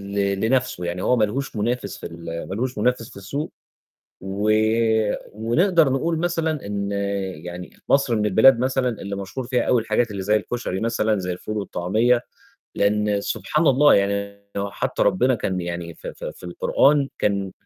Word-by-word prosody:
ل 100 Hz, -1 st, +1 dB
لنَفْسه، 120 Hz, -5 st, 0 dB
يعني 85 Hz, +1 st, -3 dB
هو 125 Hz, -, +3 dB
ما 110 Hz, -, +2 dB
لهوش 130 Hz, +4 st, -4 dB
مُنافس 110 Hz, -1 st, -2 dB
في -, -, -9 dB
ال 85 Hz, 0 st, -6 dB
ما 95 Hz, -, -3 dB
لوش 125 Hz, +2 st, -2 dB
منافس 115 Hz, +1 st, 0 dB
في -, -, -15 dB
السوق، 140 Hz, +10 st, -4 dB, 0.7 s
و 100 Hz, +2 st, -1 dB, 0.8 s
ونقدر 155 Hz, -, +3 dB
نقول 160 Hz, +5 st, 0 dB
مثلًا 160 Hz, -5 st, -1 dB
إن 100 Hz, 0 st, -3 dB, 0.5 s
يعني 90 Hz, +1 st, -8 dB
مصر 135 Hz, -4 st, +3 dB
من 105 Hz, 0 st, +1 dB
البلاد 115 Hz, +5 st, +6 dB
مثلًا 130 Hz, +1 st, +1 dB
اللي 100 Hz, -4 st, -4 dB
مشهور 100 Hz, +6 st, -5 dB
فيها 125 Hz, 0 st, +1 dB
أوي 120 Hz, -2 st, +2 dB
الحاجات 115 Hz, +1 st, 0 dB
اللي 100 Hz, -2 st, -4 dB
زي 105 Hz, +3 st, +3 dB
الكشري 105 Hz, -3 st, -3 dB
مثلًا 110 Hz, -2 st, +1 dB
زي 90 Hz, -1 st, -2 dB
الفول 105 Hz, +4 st, -5 dB
والطعمية، 110 Hz, +6 st, +1 dB, 0.5 s
لإن 105 Hz, 0 st, +1 dB
سبحان 155 Hz, +9 st, -1 dB
الله 145 Hz, +2 st, +6 dB
يعني 100 Hz, 0 st, 0 dB
هو 100 Hz, 0 st, -2 dB
حتى -, -, -2 dB
ربّنا 125 Hz, +7 st, +3 dB
كان 95 Hz, -5 st, -2 dB
يعني 85 Hz, -1 st, -5 dB
ف -, -, -12 dB
ف -, -, -7 dB
في -, -, -7 dB
القرآن 140 Hz, +10 st, +2 dB
كان 100 Hz, -2 st, 0 dB
105 Hz, 170 wpm, -23 LUFS, 100-125 Hz, 0.8 s, البلاد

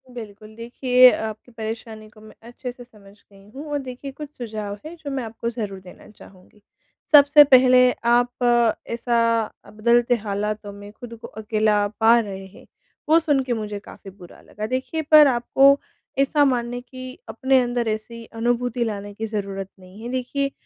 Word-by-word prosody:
बिल्कुल 215 Hz, -1 st, -10 dB
देखिए 250 Hz, +2 st, +4 dB
आपकी 220 Hz, +2 st, -6 dB
परेशानी 220 Hz, -1 st, -7 dB
को 215 Hz, 0 st, -19 dB
मैं 215 Hz, 0 st, -15 dB
अच्छे 245 Hz, +1 st, -7 dB
से 245 Hz, 0 st, -13 dB
समझ 210 Hz, -5 st, -19 dB, 0.2 s
गई 195 Hz, 0 st, -19 dB
हूँ 285 Hz, +3 st, -8 dB
और 290 Hz, -, -1 dB
देखिए 265 Hz, +1 st, -8 dB
कुछ 290 Hz, +2 st, -9 dB
सुझाव 215 Hz, -4 st, -6 dB
है 320 Hz, +2 st, -8 dB
जो 310 Hz, -4 st, -8 dB
मैं 270 Hz, -2 st, -3 dB
आपको 230 Hz, +1 st, -5 dB
ज़रूर 210 Hz, -5 st, -5 dB
देना 185 Hz, -1 st, -15 dB
चाहूँगी। 200 Hz, 0 st, -19 dB, 0.5 s
सबसे 290 Hz, 0 st, +8 dB
पहले 255 Hz, -2 st, +5 dB
आप 240 Hz, -1 st, +2 dB, 0.2 s
ऐसा 230 Hz, -2 st, 0 dB, 0.2 s
बदलते 235 Hz, +3 st, +2 dB
हालातों 210 Hz, 0 st, -3 dB
में 205 Hz, 0 st, -11 dB
ख़ुद 230 Hz, +2 st, -11 dB
को -, -, -8 dB
अकेला 215 Hz, -1 st, 0 dB
पा 225 Hz, +1 st, +6 dB
रहे 195 Hz, -3 st, -6 dB
हैं 190 Hz, -, -17 dB, 0.4 s
वो 320 Hz, +1 st, +6 dB
सुन 300 Hz, -4 st, +1 dB
के 255 Hz, -2 st, -2 dB
मुझे 210 Hz, -2 st, -5 dB
काफ़ी 200 Hz, -, -13 dB
बुरा 180 Hz, -2 st, -16 dB
लगा। 210 Hz, -, -6 dB
देखिए 260 Hz, +6 st, -3 dB
पर 305 Hz, -1 st, +9 dB
आपको 270 Hz, +3 st, +3 dB, 0.4 s
ऐसा 285 Hz, +2 st, +3 dB
मानने 245 Hz, -2 st, -1 dB
की 255 Hz, 0 st, -10 dB, 0.2 s
अपने 265 Hz, 0 st, +2 dB
अंदर 240 Hz, -1 st, -2 dB
ऐसी 220 Hz, +2 st, -5 dB
अनुभूति 240 Hz, +1 st, -1 dB
लाने 205 Hz, -2 st, -5 dB
की 220 Hz, +2 st, -5 dB
ज़रूरत 200 Hz, -2 st, -5 dB
नहीं 185 Hz, +3 st, -15 dB
है। 240 Hz, -, -5 dB
देखिए 260 Hz, +2 st, -2 dB
235 Hz, 170 wpm, -22 LUFS, 215-255 Hz, 0.5 s, पर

